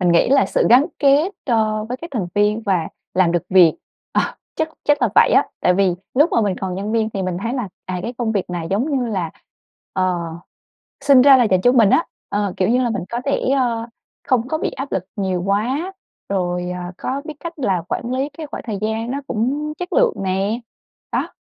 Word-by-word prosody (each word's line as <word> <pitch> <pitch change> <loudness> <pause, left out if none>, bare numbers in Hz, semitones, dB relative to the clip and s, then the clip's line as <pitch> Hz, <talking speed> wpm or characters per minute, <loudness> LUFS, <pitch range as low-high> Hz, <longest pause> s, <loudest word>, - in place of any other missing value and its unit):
mình 175 -2 +3
nghĩ 170 - +4
là 275 +1 +4
sự - - +1
gắn 255 +5 +7
kết, 290 +6 +4
ơ, 215 -3 +1
với 245 +3 -4
các 335 +5 -9
thành 220 -9 -2
viên 210 +2 +2
và 185 -6 0 0.3
làm 180 -2 +3
được 175 -2 +1
việc, 180 -4 +6 0.4
ờ, - - +3 0.4
chắc 315 0 0 0.2
chắc 290 -2 +2
là 240 - +4
vậy - - +6
á. - - +4
Tại 180 - +3
vì 190 -2 +2 0.2
lúc 295 +6 +4
mà - - +3
mình 200 -4 0
còn 185 -2 -3
nhân 200 +3 -3
viên 225 -1 +1
thì 195 -2 -3
mình 185 -1 -2
thấy 230 - -2
là, 245 -7 -2 0.2
à, 185 -1 -3
cái 235 - -4
công 230 -2 0
việc 195 -4 -2
này 175 -2 -3
giống 225 +10 0
như 260 -4 0
là, 185 -7 -2 0.6
ờ, 185 -1 +1 0.9
sinh 275 -3 +7
ra 270 0 +8
là 245 - +5
dành 185 -4 +2
cho 245 - +5
mình 230 -5 +5
á, 330 - +3 0.2
ờ, 205 -2 -1
kiểu 185 - +1
như 250 +2 +3
là 240 - +1
mình 225 - -2
có 240 +1 -3
thể, 280 - +1 0.2
ơ, 235 -3 0 0.4
không 250 -2 +2
có 315 - -1
bị - - -1
áp 270 +1 -6
lực 190 - -1
nhiều 190 -4 -1
quá, 250 - 0 0.4
rồi, 180 -2 -1
à, 180 0 -5
có 270 +2 -3
biết 310 - -6
cách 335 -2 -7
là 190 -10 +1
quản 240 +1 -3
lí 270 +3 -1
cái 315 - -6
khoảng - - -7
thời 215 -4 -3
gian 220 +2 -2
nó 280 - -2
cũng 280 +7 -1
chất 360 0 -5
lượng - - +4
nè, 195 +4 0 0.5
đó. - - 0
225 Hz, 230 wpm, -20 LUFS, 190-265 Hz, 0.9 s, ra